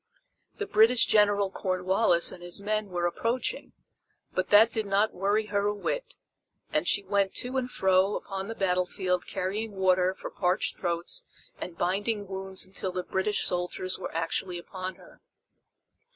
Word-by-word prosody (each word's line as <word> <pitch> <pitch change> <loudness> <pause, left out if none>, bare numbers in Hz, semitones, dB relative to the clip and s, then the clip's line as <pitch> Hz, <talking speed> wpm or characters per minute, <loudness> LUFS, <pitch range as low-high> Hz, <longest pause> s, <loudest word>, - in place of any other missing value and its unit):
The 415 - -3
British 230 - +5
General 205 -2 +3
Cornwallis 185 -1 +2
and 175 - -10
his 175 +1 -2
men 215 +1 -1
were 175 -1 -1
approaching, 235 - -2 0.6
but 185 0 -1
that 220 +3 +7
did 220 -2 -2
not 200 +2 +2
worry 205 +3 +1
her 200 0 +2
a 205 - 0
whit, - - -3 0.6
and 155 +3 +1
she 200 - +2
went 195 0 0
to 250 +2 -3
and 255 -1 -1
fro 190 -2 +2
upon 195 0 -5
the 225 - -5
battlefield 180 -1 0
carrying 205 +4 -3
water 185 -1 +2
for - - -8
parched 180 +1 0
throats 175 - -2 0.4
and 170 -2 -7
binding 205 +4 0
wounds 190 0 -4
until 190 0 -3
the 180 0 -3
British 190 +3 0
soldiers 180 +1 -1
were - - -5
actually 165 +2 -1
upon 185 +1 -6
her. - - -18
190 Hz, 155 wpm, -28 LUFS, 180-210 Hz, 0.6 s, that